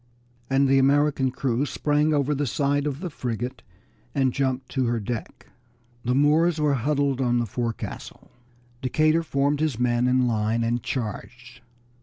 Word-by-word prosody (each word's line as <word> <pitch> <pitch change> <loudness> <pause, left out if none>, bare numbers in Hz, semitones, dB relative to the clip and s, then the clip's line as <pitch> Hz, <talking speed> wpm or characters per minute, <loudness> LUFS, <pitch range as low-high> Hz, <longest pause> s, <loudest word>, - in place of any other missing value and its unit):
and 135 +1 +3
the 135 0 +4
American 140 0 +3
crew 125 0 -1
sprang 150 +1 +1
over 145 -1 +1
the 145 0 -1
side 145 +3 0
of 145 +1 -4
the 180 - -3
frigate 125 -1 -4 0.5
and 130 -2 +2
jumped 130 -1 -1
to 130 -3 -1
her 120 0 0
deck. 110 +2 -6 0.6
The 125 +1 0
Moors 155 +4 +3
were 150 -1 +2
huddled 140 +1 0
on 120 -1 +2
the 120 - +1
forecastle. 115 +1 -5 0.5
Decatur 155 +5 +2
formed 140 -2 0
his 155 -6 0
men 120 0 +1
in 125 0 +3
line 110 0 0
and 120 +1 0
charged. 120 +1 -6
135 Hz, 155 wpm, -25 LUFS, 120-145 Hz, 0.6 s, the